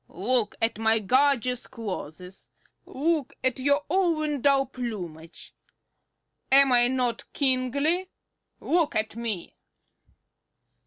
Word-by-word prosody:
Look 225 Hz, +5 st, -1 dB
at 225 Hz, -1 st, 0 dB
my 225 Hz, 0 st, +3 dB
gorgeous 250 Hz, +2 st, +1 dB
clothes; 185 Hz, -4 st, -8 dB, 0.4 s
look 305 Hz, 0 st, -1 dB
at 260 Hz, -1 st, 0 dB
your 285 Hz, +2 st, +1 dB
own 310 Hz, -5 st, 0 dB
dull 275 Hz, 0 st, +3 dB
plumage. 180 Hz, -11 st, -8 dB, 1.0 s
Am 275 Hz, 0 st, +7 dB
I 240 Hz, -1 st, +5 dB
not 250 Hz, -2 st, -2 dB
kingly? 280 Hz, +7 st, +1 dB, 0.5 s
look 335 Hz, -2 st, 0 dB
at 215 Hz, 0 st, -1 dB
me." 225 Hz, -6 st, -4 dB
255 Hz, 100 wpm, -26 LUFS, 225-285 Hz, 1.0 s, Am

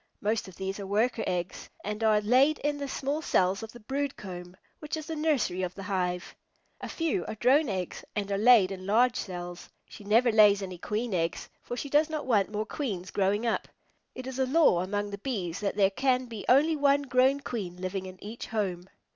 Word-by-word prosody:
Most 215 Hz, 0 st, -1 dB
of 190 Hz, -, -12 dB
these 195 Hz, +1 st, -4 dB
are 195 Hz, -, -6 dB
Worker 220 Hz, +3 st, +1 dB
eggs, 180 Hz, 0 st, -3 dB
and 210 Hz, +2 st, -4 dB
are 215 Hz, -1 st, +4 dB
laid 260 Hz, +8 st, +4 dB
in 290 Hz, 0 st, 0 dB
the 280 Hz, -, -3 dB
small 280 Hz, +3 st, -2 dB
cells 190 Hz, -9 st, +1 dB
of 220 Hz, 0 st, -7 dB
the 240 Hz, -, -12 dB
brood 275 Hz, +5 st, -3 dB
comb, 180 Hz, -2 st, -9 dB, 0.2 s
which 300 Hz, +1 st, -4 dB
is 310 Hz, -, -6 dB
the 325 Hz, 0 st, -4 dB
nursery 290 Hz, -, 0 dB
of 180 Hz, -1 st, -3 dB
the 195 Hz, -, -7 dB
hive. 180 Hz, -2 st, -2 dB, 0.5 s
A -, -, -6 dB
few 325 Hz, -, -1 dB
are 220 Hz, -, -4 dB
Drone 265 Hz, +5 st, +3 dB
eggs 185 Hz, -3 st, -4 dB
and 200 Hz, -1 st, -2 dB
are 200 Hz, -, +1 dB
laid 220 Hz, -4 st, +6 dB
in 185 Hz, 0 st, -7 dB
large 240 Hz, +4 st, +4 dB
cells. 175 Hz, -1 st, -6 dB, 0.2 s
She -, -, -12 dB
never 230 Hz, +4 st, +4 dB
lays 205 Hz, -2 st, +6 dB
any 185 Hz, -2 st, -7 dB
Queen 215 Hz, +4 st, -2 dB
eggs, 165 Hz, -2 st, -2 dB
for 245 Hz, -, -6 dB
she 285 Hz, -, -4 dB
does 295 Hz, +3 st, +3 dB
not 310 Hz, -2 st, -3 dB
want 210 Hz, -5 st, +2 dB
more 215 Hz, 0 st, -2 dB
Queens 205 Hz, -, -4 dB
growing 205 Hz, +3 st, +1 dB
up. 230 Hz, -, 0 dB, 0.5 s
It 255 Hz, -, -7 dB
is 265 Hz, 0 st, -5 dB
a 265 Hz, -, +3 dB
law 280 Hz, -, +4 dB
among 205 Hz, +2 st, -2 dB
the 200 Hz, -, -6 dB
Bees 195 Hz, -8 st, -3 dB
that 200 Hz, -2 st, -2 dB
there 195 Hz, -1 st, +3 dB
can 255 Hz, +3 st, +1 dB
be 225 Hz, -4 st, -8 dB
only 300 Hz, +5 st, +5 dB
one 285 Hz, -1 st, +3 dB
grown 260 Hz, +1 st, +3 dB
Queen 195 Hz, -10 st, -5 dB
living 185 Hz, +1 st, -4 dB
in 185 Hz, 0 st, -10 dB
each 220 Hz, +3 st, -7 dB
home. 190 Hz, -4 st, -3 dB
210 Hz, 215 wpm, -28 LUFS, 190-260 Hz, 0.5 s, laid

